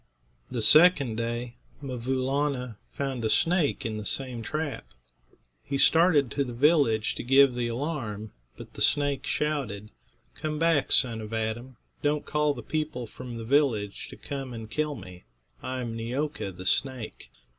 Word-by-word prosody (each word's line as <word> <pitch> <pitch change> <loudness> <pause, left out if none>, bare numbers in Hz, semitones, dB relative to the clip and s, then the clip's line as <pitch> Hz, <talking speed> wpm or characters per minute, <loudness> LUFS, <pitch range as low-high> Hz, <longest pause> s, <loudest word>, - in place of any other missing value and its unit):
The 120 -3 -2
second 150 -1 +6
day, 120 +1 -3 0.2
'Mvoo 130 -1 -2
Laana 135 -4 -1
found 135 -4 -3
a 110 - +1
snake 165 +1 +2
in 110 -1 -2
the 105 - -7
same 130 -3 -3
trap. 150 +5 -3 0.8
He 140 - -2
started 150 -2 +5
to 140 - 0
the 125 -3 -6
village 135 -6 +3
to - - -5
give 135 +1 +6
the 120 -1 -1
alarm, 115 -5 -4 0.3
but - - -11
the - - -8
snake 145 -2 +1
shouted: 125 -9 -2 0.4
"Come 155 - -4
back, 165 -3 +2
son 115 -3 +4
of 110 +1 -8
Adam; 115 +3 -3 0.2
don't 150 0 0
call 150 -1 +1
the 120 - -8
people 155 -3 -3
from 120 +1 -8
the 115 - -5
village 115 -7 +1
to - - -9
come 135 -3 -6
and 110 -1 -8
kill 150 +1 -1
me. 90 -6 -11 0.4
I 130 0 -4
am 115 -2 -4
Neeo'ka, 125 0 -3
the 90 +1 -9
snake. 130 +3 -1
130 Hz, 160 wpm, -27 LUFS, 115-145 Hz, 0.8 s, second